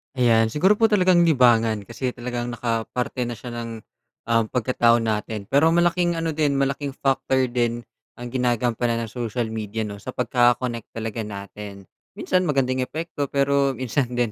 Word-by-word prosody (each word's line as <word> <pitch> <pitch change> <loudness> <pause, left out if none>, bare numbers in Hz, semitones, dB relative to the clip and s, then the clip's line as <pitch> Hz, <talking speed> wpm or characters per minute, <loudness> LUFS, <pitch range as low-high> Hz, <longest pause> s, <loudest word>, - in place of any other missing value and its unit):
Ayan, 115 -3 +4
siguro 190 - +2
po 225 - +5
talagang 185 -4 +4
libangan 115 -7 +3
kasi 125 +4 -4
talagang 120 0 -4
nakaparte 120 +2 -2
na 120 - -4
siya 120 +2 -9
ng, 120 -1 -5 0.6
um, 115 0 +4
pagkatao 120 -1 +2
natin 110 -1 -2
pero 140 +4 +4
malaking 175 0 +2
ano 165 0 -1
din 145 -2 +1
malaking 140 0 -1
factor 130 -1 +1
din 120 -1 -1 0.3
ang 120 0 -7
ginagampanan 120 -2 0
ng 115 - -7
social 120 -1 -3
media 110 0 -3
'no 100 0 -8
sa 115 - -9
pagkaka-connect 120 -2 +1
talaga 115 0 -4
natin, 100 -1 -8 0.3
minsan 185 -1 0
magandang 130 -3 +1
epekto 145 +1 -4
pero 140 0 +1
minsan 130 +1 -1
din 120 -3 0
120 Hz, 155 wpm, -23 LUFS, 115-140 Hz, 0.6 s, po